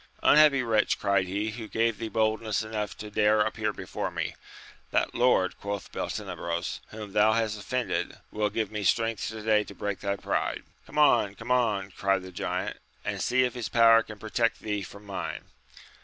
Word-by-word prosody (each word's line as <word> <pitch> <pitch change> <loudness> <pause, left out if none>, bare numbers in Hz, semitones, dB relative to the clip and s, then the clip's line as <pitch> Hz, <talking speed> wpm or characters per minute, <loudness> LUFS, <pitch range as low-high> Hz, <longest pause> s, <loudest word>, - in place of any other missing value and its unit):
Unhappy 150 -3 +6
wretch! 110 -3 +2
cried 100 -2 +1
he, 100 +4 -2
who 110 0 -7
gave 115 0 0
thee 115 - -3
boldness 110 -1 0
enough 110 -1 -4
to 105 0 -8
dare 105 0 +3
ap - - -2
pear - - -1
before - - -4
me - - -3 0.3
] - - -21
That - - +1
Lord, 120 -7 +2
quoth 100 -1 -5
Beltenebros, 85 +1 -3
whom 105 -2 -9
thou 105 +1 +5
hast 110 -2 0
offended, 125 +4 -2
who - - -9
will 105 -1 +2
give 110 0 -2
me 105 -1 -3
strength 115 +2 +1
to 110 -1 -6
day 105 -1 +3
to - - -11
break 100 -2 -3
thy 100 0 -1
pride. - - -2 0.2
Come - - -9
on! 120 -9 +4
come 115 +3 -6
on! 105 -6 +1
cried 95 0 0
the 95 - -9
giant, 85 - -3 0.3
and - - -2
see 130 +1 +3
if 125 -2 0
his 120 -5 -4
power 115 -1 +6
can 110 -1 -9
protect 115 +2 0
thee 105 -1 -2
from 100 +2 -10
mine! 100 -1 -5
110 Hz, 195 wpm, -28 LUFS, 100-115 Hz, 0.3 s, Unhappy